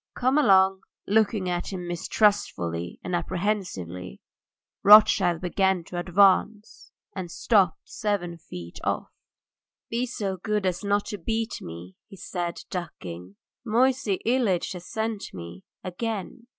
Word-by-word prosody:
"Come 260 +4 +2
along!" 190 -6 +5 0.2
Looking 210 -2 +2
at 175 +1 -2
him 180 -2 -5
mistrustfully 170 - 0
and 180 - -2
apprehensively, 170 - -3 0.6
Rothschild 200 -5 +7
began 190 0 +1
to 175 +1 -6
advance, 200 +4 +2 0.3
and 185 -3 -5
stopped 190 -1 +2
seven 175 -5 -2
feet 85 - -9
off. - - -2 0.8
"Be 240 +2 0
so 200 -5 -3
good 210 +1 -1
as 185 +1 -1
not 205 0 +1
to 205 - -5
beat 225 +5 -2
me," 85 +3 -9
he - - -12
said, 175 -2 -4
ducking. 95 - -7 0.3
"Moisey 245 -2 +2
Ilyitch 230 -7 +1
has 180 -1 -9
sent 220 - -4
me 85 +1 -9 0.2
again. 225 +4 -5
190 Hz, 125 wpm, -26 LUFS, 170-215 Hz, 0.8 s, Rothschild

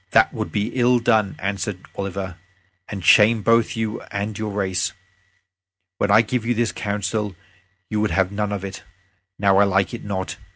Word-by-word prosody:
"That - - +5
would - - -4
be 105 +1 -1
ill 125 -1 +3
done," 110 -4 +2
answered 100 +1 -3 0.2
Oliver, 95 -2 -4 0.5
"and 100 -4 -6
shame 110 +2 +6
both 115 0 +3
you 110 -1 -2
and 100 +1 -3
your 110 0 -3
race. 95 -3 -1 1.1
When 100 - +1
I 105 +3 +6
gave 120 +1 -2
you 120 +1 0
this 115 0 +1
counsel 105 0 -2 0.5
you 105 -1 -1
would 110 - +1
have 95 -1 +1
none 105 0 -2
of 100 -1 -3
it. 95 0 -7 0.6
Now 100 -1 +3
I 100 - +7
like 95 0 +1
it 120 - -6
not. 95 -2 -4
105 Hz, 175 wpm, -22 LUFS, 100-110 Hz, 1.1 s, I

